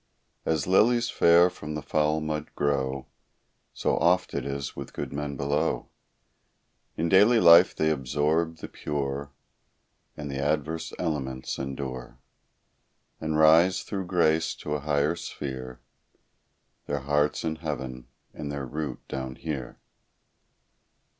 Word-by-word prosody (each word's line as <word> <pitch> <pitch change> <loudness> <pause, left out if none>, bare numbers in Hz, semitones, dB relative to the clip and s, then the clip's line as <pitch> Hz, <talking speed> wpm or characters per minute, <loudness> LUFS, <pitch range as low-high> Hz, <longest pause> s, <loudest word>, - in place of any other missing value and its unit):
As 80 -3 +1
lilies 115 +5 +3
fair 85 +1 +6
from 75 -4 -6
the 75 - -5
foul 75 0 +1
mud 75 -1 -3
grow, 70 -2 -1 0.7
So - - 0
oft 90 +3 +2
it - - -2
is 70 0 -4
with - - -8
good - - -5
men 70 -1 -4
below; 70 +4 -1 1.1
In 85 - 0
daily 105 +7 +6
life 85 -1 +7
they 80 0 +2
absorb 75 +4 0
the - - -7
pure, 70 -1 -4 0.9
And 75 -1 -5
the 70 - -4
adverse 75 +3 -1
elements 65 -6 -3
endure; 65 -3 -5 1.0
And 80 -1 -1
rise, 80 +4 +5
through 95 -3 -4
grace, 80 -3 +2
to 75 - -5
a 75 - -1
higher 75 +2 +1
sphere, 65 -6 -6 1.1
Their 70 -1 -2
hearts 75 +2 +1
in 80 -1 -2
heaven, 65 -6 -5 0.3
and 70 -1 -5
their 70 -1 -4
root 70 0 -5
down 65 -1 -5
here. 70 -6 -5
75 Hz, 125 wpm, -27 LUFS, 70-80 Hz, 1.1 s, life